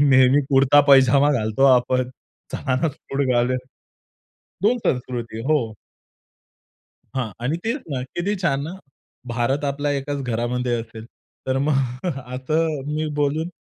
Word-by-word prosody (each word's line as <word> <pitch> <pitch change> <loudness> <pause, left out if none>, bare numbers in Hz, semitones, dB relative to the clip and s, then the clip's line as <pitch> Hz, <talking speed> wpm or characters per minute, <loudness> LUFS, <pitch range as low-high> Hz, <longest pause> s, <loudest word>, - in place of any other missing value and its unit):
नेहमी 135 -1 +5
कुर्ता-पैजामा 140 0 +5
घालतो 110 +1 +1
आपण, 125 +1 0 0.4
चला 130 - -1
ना 165 - +3
सूट 140 0 -3
घालूया. 125 +1 +2 1.1
2 240 +4 +4
संस्कृती, 120 -3 -2
हो. 125 -8 +1 1.4
हां 125 -5 -2
आणि 145 +7 0
तेच 245 +5 -1
ना 130 - -2
किती 200 +4 -1
छान 140 -5 +1
ना, 165 - -6 0.6
भारत 130 +5 0
आपला 145 +1 -2
1 145 +1 -4
घरामध्ये 120 +1 -1
असेल. 115 -1 -11 0.4
तर 130 0 +1
मग. 145 +3 +1 0.6
असं 155 +3 -1
मी 155 +1 -1
बोलून 155 +4 0
135 Hz, 125 wpm, -22 LUFS, 125-145 Hz, 1.4 s, नेहमी